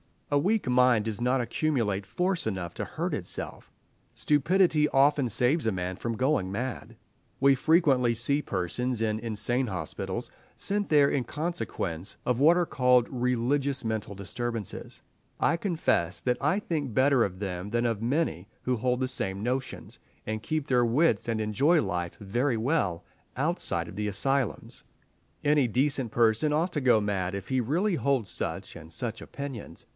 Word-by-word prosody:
A 145 Hz, -, +5 dB
weak 210 Hz, +7 st, +1 dB
mind 125 Hz, -3 st, +4 dB
does 110 Hz, -1 st, -3 dB
not 125 Hz, +2 st, +1 dB
accumulate 115 Hz, -6 st, -1 dB
force 180 Hz, -, -1 dB
enough 95 Hz, -5 st, -3 dB
to -, -, -3 dB
hurt -, -, -3 dB
itself; -, -, -5 dB, 0.5 s
stupidity 155 Hz, +1 st, +3 dB
often 140 Hz, 0 st, +3 dB
saves 125 Hz, +6 st, +2 dB
a 110 Hz, -, +1 dB
man 90 Hz, 0 st, -3 dB
from 115 Hz, -1 st, -3 dB
going 130 Hz, -6 st, +1 dB
mad. 120 Hz, +5 st, -4 dB, 0.5 s
We 140 Hz, 0 st, +6 dB
frequently 135 Hz, -4 st, +3 dB
see 140 Hz, +6 st, +2 dB
persons 115 Hz, +5 st, -2 dB
in 110 Hz, -1 st, 0 dB
insane 115 Hz, +3 st, 0 dB
hospitals, 90 Hz, -7 st, -4 dB, 0.2 s
sent 205 Hz, 0 st, 0 dB
there 145 Hz, -2 st, +5 dB
in 130 Hz, -3 st, 0 dB
consequence 100 Hz, -, -3 dB
of 125 Hz, -1 st, +1 dB
what 160 Hz, +5 st, +6 dB
are 175 Hz, -, +2 dB
called 125 Hz, -5 st, +3 dB
religious 130 Hz, +2 st, 0 dB
mental 110 Hz, -2 st, -3 dB
disturbances. 115 Hz, +2 st, -4 dB, 0.4 s
I -, -, +3 dB
confess 160 Hz, -, 0 dB
that 125 Hz, -1 st, 0 dB
I 150 Hz, +8 st, +2 dB
think 150 Hz, -, -3 dB
better 130 Hz, 0 st, +4 dB
of 95 Hz, -1 st, -6 dB
them 95 Hz, -1 st, -4 dB
than 120 Hz, +2 st, 0 dB
of 115 Hz, -3 st, -1 dB
many 120 Hz, -, -1 dB, 0.2 s
who 125 Hz, -1 st, 0 dB
hold 125 Hz, +2 st, 0 dB
the 130 Hz, -, 0 dB
same 95 Hz, -5 st, -3 dB
notions, 130 Hz, +2 st, -3 dB, 0.3 s
and 110 Hz, 0 st, -3 dB
keep 155 Hz, +4 st, -2 dB
their 125 Hz, -3 st, +3 dB
wits 120 Hz, -1 st, +2 dB
and 115 Hz, -2 st, -1 dB
enjoy 140 Hz, -, +3 dB
life 90 Hz, -3 st, -3 dB
very 120 Hz, +5 st, 0 dB
well, 110 Hz, -, 0 dB, 0.3 s
outside 130 Hz, -, -1 dB
of 95 Hz, -, -10 dB
the 105 Hz, 0 st, -1 dB
asylums. 130 Hz, +4 st, -2 dB, 0.6 s
Any 145 Hz, -3 st, +3 dB
decent 130 Hz, 0 st, 0 dB
person 115 Hz, +6 st, +3 dB
ought 165 Hz, +4 st, +1 dB
to 150 Hz, -, -1 dB
go 120 Hz, -4 st, +4 dB
mad 100 Hz, -2 st, -1 dB
if 100 Hz, -1 st, -6 dB
he 130 Hz, -1 st, +1 dB
really 170 Hz, -, +1 dB
holds 135 Hz, -, 0 dB
such -, -, -4 dB
and 80 Hz, 0 st, -12 dB
such 115 Hz, +5 st, -4 dB
opinions…. 130 Hz, -, -7 dB
125 Hz, 160 wpm, -28 LUFS, 105-145 Hz, 0.6 s, We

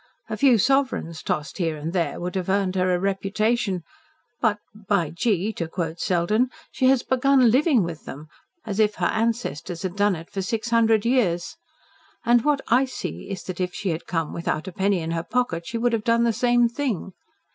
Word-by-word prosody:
A -, -, 0 dB
few 265 Hz, -4 st, +5 dB
sovereigns 250 Hz, -, +1 dB
tossed 150 Hz, +5 st, -3 dB
here 165 Hz, -3 st, 0 dB
and 155 Hz, +3 st, -5 dB
there 175 Hz, -3 st, -1 dB
would 180 Hz, 0 st, -4 dB
have 190 Hz, -1 st, -3 dB
earned 195 Hz, -1 st, +1 dB
her 185 Hz, 0 st, +2 dB
a 180 Hz, -, +2 dB
reputation 195 Hz, 0 st, 0 dB, 0.6 s
but, 220 Hz, -3 st, +2 dB, 0.2 s
by 195 Hz, -6 st, -1 dB
gee! 205 Hz, +3 st, 0 dB
to 170 Hz, -4 st, -3 dB
quote 165 Hz, -1 st, -4 dB
Selden 200 Hz, +9 st, +1 dB, 0.2 s
she 260 Hz, -, +1 dB
has 265 Hz, -2 st, +4 dB
begun 260 Hz, -2 st, +4 dB
LIVING 265 Hz, -, +4 dB
with 170 Hz, -2 st, -6 dB
them, 145 Hz, +3 st, -8 dB, 0.4 s
as 210 Hz, -2 st, -3 dB
if 215 Hz, -1 st, +3 dB
her -, -, -1 dB
ancestors 220 Hz, -7 st, -1 dB
had 185 Hz, -1 st, -3 dB
done 205 Hz, -1 st, +2 dB
it 165 Hz, 0 st, -10 dB
for 195 Hz, -, -3 dB
six 225 Hz, +4 st, -3 dB
hundred 225 Hz, -2 st, +3 dB
years. 210 Hz, -9 st, +1 dB, 0.7 s
And 240 Hz, 0 st, +4 dB
what 295 Hz, -2 st, +2 dB
I 250 Hz, +4 st, +4 dB
see 90 Hz, -, -6 dB
is 190 Hz, -3 st, -5 dB
that 185 Hz, 0 st, -5 dB
if 180 Hz, 0 st, -2 dB
she 195 Hz, -, -2 dB
had 165 Hz, 0 st, -3 dB
come 165 Hz, -3 st, -2 dB
without 170 Hz, 0 st, -2 dB
a -, -, -4 dB
penny 190 Hz, 0 st, +1 dB
in 160 Hz, +1 st, -3 dB
her 165 Hz, 0 st, -1 dB
pocket 170 Hz, -5 st, -1 dB
she 230 Hz, -, -3 dB
would 240 Hz, +1 st, +1 dB
have 220 Hz, -2 st, 0 dB
done 230 Hz, +1 st, +3 dB
the 235 Hz, -1 st, +2 dB
same 240 Hz, +1 st, +3 dB
thing." 235 Hz, -, -3 dB
200 Hz, 200 wpm, -24 LUFS, 175-235 Hz, 0.7 s, few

